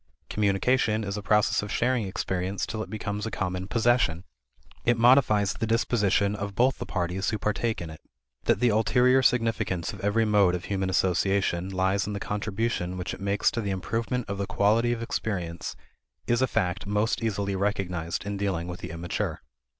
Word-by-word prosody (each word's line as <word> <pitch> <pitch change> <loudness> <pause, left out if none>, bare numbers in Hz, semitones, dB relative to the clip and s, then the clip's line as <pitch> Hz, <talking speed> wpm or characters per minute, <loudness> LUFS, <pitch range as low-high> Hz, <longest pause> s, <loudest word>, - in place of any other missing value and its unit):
Communication 105 +2 +2
is 100 -1 -3
a 105 - -4
process 105 +1 +2
of 105 0 -6
sharing 120 -3 +1
experience 95 0 -2
till 110 -1 -4
it - - -6
becomes 105 0 -3
a - - -2
common 90 -3 -3
possession. 115 -7 +2 0.6
It 120 -1 +3
modifies 115 -5 +4
the 115 - -3
disposition 105 -3 +2
of 100 -1 -5
both 125 +3 +2
the - - -5
parties 90 +3 -1
who 110 - -1
partake 105 +2 -1
in 80 - -7
it. 80 - -12 0.4
That - - +2
the 125 - +4
ulterior 125 +4 +4
significance 115 -8 +1
of - - -9
every 105 +3 +1
mode 100 -4 +4
of 90 - -5
human 95 -2 -1
association 95 0 +1
lies 95 +1 0
in 105 - -3
the 100 - -3
contribution 105 -2 -2
which 90 +1 -4
it - - -9
makes 100 +1 +1
to 115 - -2
the 100 - -3
improvement 115 +6 -2
of 100 -1 -4
the 100 - -2
quality 110 +4 +2
of 115 -1 -2
experience 90 -7 -3 0.5
is 120 +1 +1
a 130 - +3
fact 95 -2 -1
most 105 +4 0
easily 100 -3 -1
recognized 95 -3 -2
in 100 0 -3
dealing 95 -4 -1
with 90 0 -6
the 90 - -7
immature. 85 +1 -3
100 Hz, 185 wpm, -27 LUFS, 95-115 Hz, 0.6 s, modifies